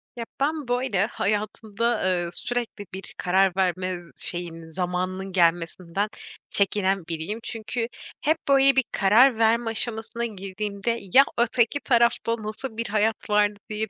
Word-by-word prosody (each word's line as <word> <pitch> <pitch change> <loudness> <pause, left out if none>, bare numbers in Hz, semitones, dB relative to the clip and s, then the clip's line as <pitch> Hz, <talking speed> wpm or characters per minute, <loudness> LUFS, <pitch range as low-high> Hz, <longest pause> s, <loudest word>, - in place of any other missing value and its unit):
Ya, 230 -1 -5
ben, 295 0 -1
böyle, 245 -5 +1
hayatımda, 215 +2 -1
eee, 175 -2 +1
sürekli 240 -4 -4
bir 190 0 -8
karar 190 0 +2
verme, 185 -1 0
ııı, 175 -1 -9
şeyin, 165 -2 -6
zamanının 185 +2 -3
gelmesinden 175 +2 +1 0.4
çekinen 195 -3 +1
biriyim. 170 +6 -3
Çünkü 230 +1 -3 0.3
hep 315 +2 +2
böyle 275 -1 +6
bir 265 - +4
karar 225 +5 +5
verme 230 +1 +3
aşamasına 225 +1 -1
girdiğimde, 200 +2 -3
ya, 275 - +9
öteki 235 +3 +2
tarafta 235 -2 +2
nasıl 220 +2 -6
bir 230 - -2
hayat 215 +1 0
var, 210 0 +4 0.2
diye 215 0 -3
210 Hz, 135 wpm, -25 LUFS, 185-235 Hz, 0.4 s, ya